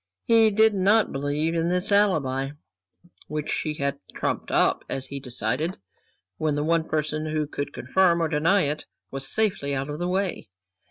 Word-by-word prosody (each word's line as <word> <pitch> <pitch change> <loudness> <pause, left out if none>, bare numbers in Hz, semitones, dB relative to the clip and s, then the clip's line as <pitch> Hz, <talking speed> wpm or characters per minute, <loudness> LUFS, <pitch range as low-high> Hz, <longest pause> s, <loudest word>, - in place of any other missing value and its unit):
He 225 -2 +5
did 220 +1 +4
not 200 +3 +3
believe 145 +4 -1
in 165 0 0
this 180 +3 0
alibi, 145 -10 +2 0.7
which 150 0 -3
she 155 -1 -2
had 140 -1 -2 0.2
trumped - - -2
up, - - +2
as 135 - -3
he 140 - -6
decided, 135 +6 -2 0.6
when 155 -2 0
the 145 - 0
one 165 +1 +2
person 155 0 -1
who 155 -1 -1
could 145 -1 -5
confirm 170 +7 +2
or 165 - +1
deny 165 +6 +3
it 150 0 -2 0.2
was 135 0 -1
safely 165 -7 0
out 135 +2 -3
of 150 - -5
the 175 - -1
way. 185 - -2
155 Hz, 170 wpm, -25 LUFS, 145-185 Hz, 0.7 s, He